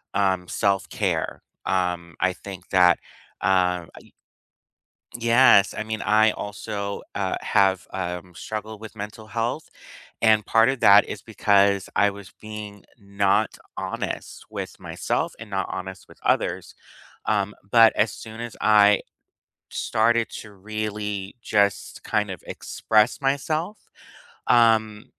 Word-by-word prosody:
um, 95 -3 +1
self-care. 100 0 -1 0.2
Um, 90 -2 -1
I 95 0 +2
think 95 -1 -10
that, 90 -2 +5 0.4
uh, 90 -2 +2
I - - -15 1.1
Yes, 115 -3 +5
I - - -2
mean, 110 0 -4
I 110 0 +4
also, 105 -1 -5
uh, - - -1
have, 95 -2 +2
um, 90 -1 -5
struggled 110 +2 -6
with 110 0 -10
mental 105 +1 -8
health, 120 +7 -3 0.5
and 110 -1 +4
part 115 0 +4
of 135 -1 -1
that 100 -1 +7
is - - -6
because 100 -1 +2
I 100 +2 +4
was 100 -1 -11
being 105 -2 -8
not 100 0 0 0.2
honest - - -5
with - - -7
myself - - -2
and 115 - -10
not 95 0 -1
honest 95 0 -7
with - - -17
others, - - 0 0.5
um, 105 -1 0 0.2
but 115 -1 +7
as 105 - +2
soon 110 +2 -9
as 120 -2 -6
I 105 -1 +5 0.7
started 115 +1 +1
to 105 - -9
really 105 -1 -4
just 100 -2 0
kind 105 -1 0
of 90 -4 -7
express 110 +2 +1
myself, 155 +8 -2 0.6
um, 110 -2 +3
105 Hz, 125 wpm, -24 LUFS, 95-110 Hz, 1.1 s, that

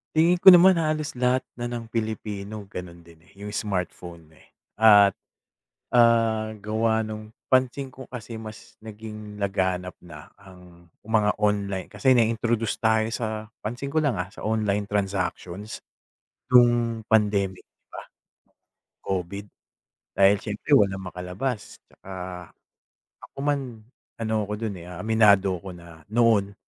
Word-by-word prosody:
Tingin 170 +3 +4
ko - - -2
naman 180 -1 +9
halos 155 -2 -1
lahat 125 0 +2 0.2
na 120 - -2
ng 120 -2 -6
Pilipino 110 -2 -4
gano'n 85 -1 -8
din, 85 -1 -18
eh, - - -24
'yong 100 +1 -8
smartphone, 90 -5 -5
eh. 80 - -22 0.3
At, 105 -3 +7 0.8
ah, 115 -2 +3
gawa 110 +2 0
nung 110 +1 -8 0.2
pansin 130 +1 +1
ko 130 0 -11
kasi 115 -2 -8
mas 110 -1 -11
naging 105 -1 -9
laganap 95 -2 -1
na 75 -4 -13
ang 90 -2 -17 0.2
mga 105 -1 +1
online. 100 -2 0
Kasi 130 -1 +3
na-introduce 115 -1 +1
tayo 110 -1 +3
sa 110 -1 -4
pansin 120 +6 -5
ko 155 - +2
lang, 145 -7 +1
ah, 90 +2 -4
sa - - -7
online 105 -2 0
transactions 100 0 -3 0.7
no'ng 120 -2 +4
pandemic, 100 -3 +1
'di - - -58
ba? - - -9 1.0
COVID. 95 +1 -3 0.7
Dahil 100 +1 +5
siyempre 105 +7 +1
walang 95 -3 +1
makalabas, 95 +7 -5
tsaka 95 - -13 1.1
ako - - -17
man, 135 -6 -2 0.4
ano 110 -1 0
ko 105 - -5
do'n, 105 -1 -4
eh, 85 - -11
ah, 90 0 -8
aminado 100 -3 +4
ko 95 +2 -9
na 85 -2 -14
noon 110 -4 +3
110 Hz, 135 wpm, -25 LUFS, 95-115 Hz, 1.1 s, naman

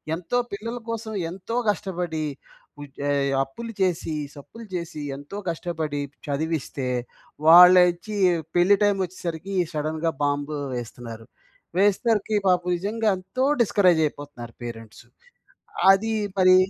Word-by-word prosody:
ఎంతో 180 +8 -2
పిల్లల 230 +4 -5
కోసం 225 -1 -4 0.2
ఎంతో 190 +6 -6
కష్టపడి, 180 -5 -2 0.6
ఉజే 145 0 -4 0.3
అప్పులు 230 +13 -8
చేసి, 170 -4 0 0.2
సప్పులు 225 +11 -11
చేసి, 170 -3 -4 0.2
ఎంతో 145 +8 -8
కష్టపడి 160 -3 -3 0.3
చదివిస్తే, 145 -2 -2 0.6
వాళ్ళోచ్చి 180 +3 +7 0.4
పెళ్లి 185 +3 +5
టైమ్ 205 -1 +3
వచ్చేసరికి 175 +1 -6 0.2
సడెన్‌గా 155 +2 -1
బాంబ్ 145 +1 -1 0.2
వేస్తున్నారు. 115 -1 -7 0.5
వేసేసరికి 210 +2 +2
పాపం 180 -1 +2
నిజంగా 215 +5 -2
ఎంతో 190 +8 -3 0.2
డిస్కరేజ్ 185 -7 +4
అయిపోతున్నారు 145 -6 -9
పేరెంట్స్. 115 -2 -9 0.9
అది 220 +3 +2 0.2
మరి 185 -1 +6
175 Hz, 105 wpm, -24 LUFS, 145-200 Hz, 0.9 s, వాళ్ళోచ్చి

